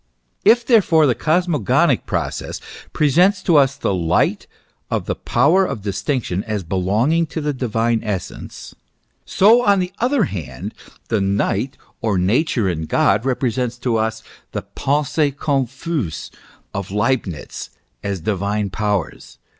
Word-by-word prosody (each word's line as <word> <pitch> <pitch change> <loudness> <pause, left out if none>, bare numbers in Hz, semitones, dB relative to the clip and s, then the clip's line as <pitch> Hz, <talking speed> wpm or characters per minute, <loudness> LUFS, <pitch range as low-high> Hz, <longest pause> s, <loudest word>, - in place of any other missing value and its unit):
If, 240 0 +5
therefore, 190 -10 +4
the 130 - +3
cosmogonic 155 - +1
process - - -3 0.3
presents 180 +7 +3
to 170 - +3
us 135 -1 +4
the 135 - -1
Light 85 -2 +1 0.4
of - - -1
the - - -1
power 180 +7 +3
of 135 - -3
distinction 100 0 -2
as 105 -3 -3
belonging 105 - +1
to 160 - -5
the 150 -1 -1
divine 115 -3 0
essence; 100 -5 -6 0.5
so, 225 +5 +5
on 200 -2 +4
the 180 0 -2
other 250 0 +2
hand, 75 - -5 0.4
the 110 -3 +1
Night 100 +5 0 0.2
or 105 -4 +1
Nature 110 - +1
in 80 -3 -2
God, 105 +5 +2
represents 125 -2 -1
to 120 -2 0
us 110 0 -2 0.3
the - - -3
Pensees 145 0 +1
confuses 135 - -2 0.4
of 100 -1 -4
Leibnitz 105 - -2 0.3
as 100 -3 -3
divine 100 +1 -1
powers. 105 -3 -3
120 Hz, 130 wpm, -20 LUFS, 100-155 Hz, 0.5 s, If